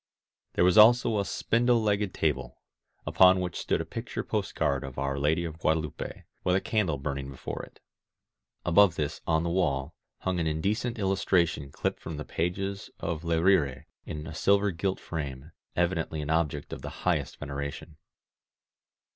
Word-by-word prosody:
There - - +3
was 90 +3 +6
also 115 0 +6
a - - +1
spindle 120 +5 +2
legged 105 -2 +1
table, 75 -6 -1 0.5
upon 95 0 +6
which 90 -2 -3
stood - - 0
a - - -4
picture - - -5
postcard 70 -1 -1
of 65 -1 -8
Our 70 0 -1
Lady 75 +4 +2
of 80 -1 -7
Guadelupe, 80 -2 -2 0.2
with 90 - +2
a - - +4
candle 95 -8 0
burning 70 -1 -4
before 65 - -6
it. - - -13 0.9
Above 90 0 +5
this, 75 -1 -3
on 80 0 +2
the 85 - -1
wall, 75 -5 0 0.3
hung 95 -1 -1
an 80 - 0
indecent 105 +10 -1
illustration 95 -7 +1
clipped - - -2
from 80 -2 -6
the 75 - -5
pages 95 +4 -2
of 80 -1 -3
Le 85 -1 +1
RirCy 80 -8 +3 0.2
in 75 0 -6
a 85 - -7
silver 100 +4 +3
gilt 95 +3 -2
frame 70 -2 -6
— - - -47
evidently 85 -3 0
an 75 - -3
object 75 -3 0
of - - -6
the - - -5 0.2
highest - - 0
veneration. 70 +2 -6
85 Hz, 165 wpm, -28 LUFS, 75-95 Hz, 0.9 s, was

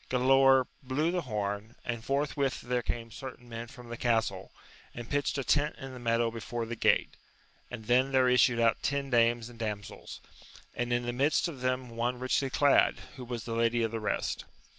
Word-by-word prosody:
Galaor 135 +1 +5 0.2
blew 145 +6 0
the 180 0 0
horn, 105 -3 -3
and 115 -2 -3
forthwith 140 0 -1
there 125 0 -1
came 115 0 -4
certain 125 0 -9
men 115 0 -6
from 120 0 -12
the 120 - -5
castle, 115 -6 0 0.4
and 120 -1 -7
pitched 145 +2 0
a 140 - -1
tent 150 +3 +2
in 135 -2 -8
the 125 - -8
meadow 115 -1 +1
before 115 +1 -4
the 120 +1 -5
gate, - - +2 0.5
and 115 -3 -8
then 130 +4 +3
there 130 -1 +4
issued 125 -1 +4
out 115 -1 +3
ten 140 -1 -1
dames 120 -1 +3
and 120 -1 -13
damsels, 105 -3 -5 0.5
and 120 0 -2
in 120 0 +1
the 120 - -2
midst 140 +7 +2
of 145 -7 -8
them 130 -1 -1
one 120 +2 -1
richly 130 +2 0
clad, 140 +1 +4 0.2
who 130 - -7
was 120 -2 -5
the 115 - -5
lady 115 0 +2
of 115 - -1
the 115 - -3
rest. 105 - -2
120 Hz, 195 wpm, -30 LUFS, 115-130 Hz, 0.5 s, Galaor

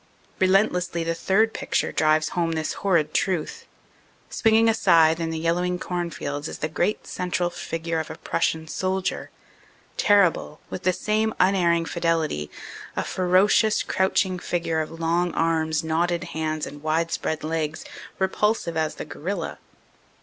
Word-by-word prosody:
Relentlessly 185 -3 +2
the 165 0 -1
third 215 +6 +2
picture - - -1
drives 155 0 +2
home 170 -2 -1
this 160 -1 -2
horrid 170 -6 +2
truth. 180 -5 -1 0.6
Swinging 225 0 +4
a 225 - +4
scythe 165 -6 +4
in 165 -1 -2
the 160 - -3
yellowing 175 +2 0
cornfields 170 -5 -4
is - - -6
the 155 - -2
great 175 +6 -1
central 180 -1 -2
figure 165 -1 -3
of 160 - -4
a - - -6
Prussian 160 0 -1
soldier, 190 +3 -2 0.7
terrible, 180 -6 +3
with - - -5
the 185 -1 +2
same 215 +4 0
unerring 175 -3 +3
fidelity 165 - -1 0.5
a - - -1
ferocious, 185 +4 +3
crouching 190 -1 +1
figure 165 -2 -1
of 155 - -4
long 165 +2 -1
arms, 160 -1 +1
knotted 170 +2 0
hands 155 -1 -2
and 145 0 -9
widespread 160 0 -1
legs, 155 -1 -2 0.3
repulsive 190 -2 0
as 160 -1 -1
the - - -6
gorilla. 175 +1 -5
170 Hz, 140 wpm, -24 LUFS, 160-185 Hz, 0.7 s, Swinging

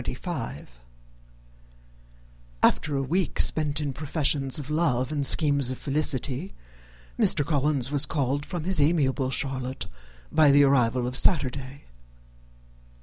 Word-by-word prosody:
After 150 -3 +2
a 135 - -1
week 175 +6 -2
spent 150 -1 +2
in 145 -3 -3
professions 140 -1 0
of 145 -1 -6
love 140 -5 0
and 145 -3 +1
schemes 145 -4 +3
of 130 - -4
felicity, 145 +3 -1 0.6
Mr. 145 - +3
Collins 145 -3 0
was 145 -1 +2
called 140 -1 -2
from 175 +1 -6
his 185 -3 +1
amiable 140 -4 +1
Charlotte 130 -3 -4 0.5
by 155 -2 +4
the 145 +1 +5
arrival 125 -3 +2
of 125 +1 -4
Saturday. 140 -4 0
140 Hz, 115 wpm, -25 LUFS, 130-150 Hz, 0.6 s, the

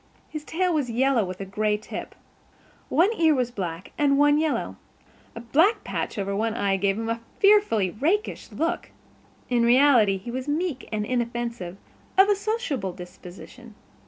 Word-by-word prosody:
His 305 -1 -5
tail 360 +3 0
was 290 -6 0
yellow 250 0 +2
with 185 -1 -6
a - - -4
gray 210 +2 0
tip. 210 - -8 0.7
One 360 +7 +3
ear 320 -2 +5
was 250 -2 -1
black 180 -5 -5
and 280 -1 +3
one 290 +1 +4
yellow. 315 -1 -1 0.6
A - - -6
black 335 - +2
patch - - -4
over 200 0 -2
one 220 +2 -1
eye 200 -3 +1
gave 195 +1 0
him 225 0 -3
a 230 0 -2 0.2
fearfully 395 - +4
rakish 345 - -1
look. 330 +2 -2 0.6
In 245 -2 +1
reality 240 -4 +5
he 200 +5 -8
was 260 +2 -4
meek 300 -2 -2
and 210 -1 -1
inoffensive, 235 -6 -3 0.4
of 385 +2 +7
a 410 - +4
sociable 385 - -2
disposition. 180 +6 -12
240 Hz, 160 wpm, -25 LUFS, 210-305 Hz, 0.7 s, of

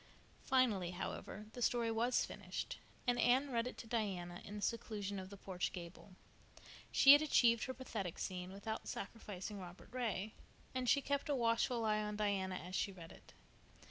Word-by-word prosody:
Finally, 225 -9 +3
however, 190 +3 -5
the 245 - -7
story 235 -1 +2
was 235 +3 +2
finished, - - -5 0.3
and 245 -1 +2
Anne 265 +3 +4
read 235 0 +1
it - - -6
to - - -7
Diana 190 -6 -2
in 205 - -7
the 205 - -5
seclusion 205 -4 -2
of 185 0 -7
the 200 - -9
porch 185 -2 -2
gable. 180 +2 -9 0.8
She 275 - +9
had 290 - +7
achieved 235 -6 +4
her 260 - -3
"pathetic 210 -9 -4
scene" 180 0 -4
without 205 +3 -5
sacrificing 205 -1 -5
Robert 180 -1 -10
Ray, 220 -4 -2 0.4
and 255 -1 0
she 280 +2 +4
kept 280 +1 -1
a 285 - +3
watchful 235 -1 +2
eye 215 0 +2
on 210 0 -3
Diana 200 -3 0
as 180 +1 -7
she 200 - 0
read 170 -3 -10
it. - - -16
215 Hz, 175 wpm, -38 LUFS, 190-245 Hz, 0.8 s, She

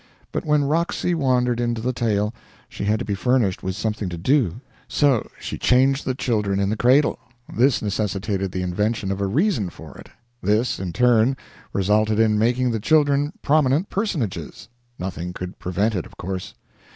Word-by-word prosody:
But - - -3
when 150 -1 +3
Roxy 170 +4 0
wandered 125 -6 +1
into 120 -1 -1
the 125 +3 -1
tale 105 -3 0 0.3
she - - -6
had 105 +1 +2
to - - -4
be 100 - -2
furnished 115 -2 +1
with 95 0 -3
something 105 -2 -2
to 85 - -5
do; 115 - +1 0.3
so 140 -7 +2
she - - -6
changed 135 +2 +3
the 130 - -1
children 105 -6 0
in 100 0 +1
the - - 0
cradle; 130 +6 +3 0.4
this 125 -2 +3
necessitated 100 -2 -2
the 90 0 -3
invention 105 +3 -1
of 95 +1 -3
a 100 - +1
reason 135 - +1
for 80 -4 -12
it; - - -12 0.3
this, 105 +5 +1
in 95 -2 -3
turn, 120 +5 +3 0.3
resulted 105 +2 +2
in 110 -1 +3
making 125 +2 +2
the 110 - -1
children 145 +3 +3
prominent 150 +3 +2
personages 170 - -3 0.3
nothing 90 -1 -5
could 90 0 -7
prevent 100 +5 0
it 90 -5 -3
of - - -19
course. 95 0 -5
110 Hz, 175 wpm, -22 LUFS, 100-130 Hz, 0.4 s, when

